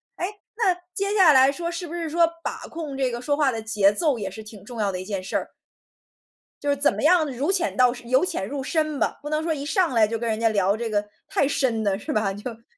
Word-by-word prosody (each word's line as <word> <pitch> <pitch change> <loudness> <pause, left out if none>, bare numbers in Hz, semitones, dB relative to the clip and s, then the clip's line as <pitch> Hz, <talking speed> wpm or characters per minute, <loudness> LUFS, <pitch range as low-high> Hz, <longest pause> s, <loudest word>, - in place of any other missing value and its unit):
哎？ - - -2 0.3
那 405 -5 +2 0.2
接 400 +1 -1
下 360 -7 +7
来 265 0 +6
说， 340 +4 -4
是 345 0 -5
不 330 - -8
是 335 -2 -3
说 335 +1 +4 0.2
把 - - -5
控 315 -4 -6
这 265 -2 +1
个 235 - -4
说 285 +3 0
话 285 -3 +2
的 225 - -4
节 215 -3 +3
奏 270 +3 0
也 195 -2 -3
是 215 +3 -9
挺 210 -2 -12
重 235 +2 -9
要 205 -2 +1
的 185 -1 -4
一 - - -6
件 195 -2 -3
事 190 - -6
儿？ - - -1 1.1
就 290 - -2
是 285 - +3
怎 285 - +3
么 - - -4
样 335 0 +5
如 275 +8 -1
浅 355 -4 0
到 250 -1 +4
深 240 -1 -11
由 260 +5 +4
浅 190 - -3
入 280 +3 -4
深 310 -1 -1
吧， - - -1
不 295 - -6
能 305 0 0
说 320 0 0
一 285 -1 -5
上 360 0 +1
来 225 -3 +4
就 225 +2 -2
跟 235 0 -2
人 220 0 -1
家 230 0 +3
聊 200 -2 +2
这 235 0 -3
个 210 -1 0 0.2
太 280 - +1
深 260 -6 0
的， 200 -2 +1
是 205 - -6
吧？ 210 -2 0
就 205 +5 -6
嗯。 230 0 -15
260 Hz, 295 characters per minute, -24 LUFS, 220-315 Hz, 1.1 s, 下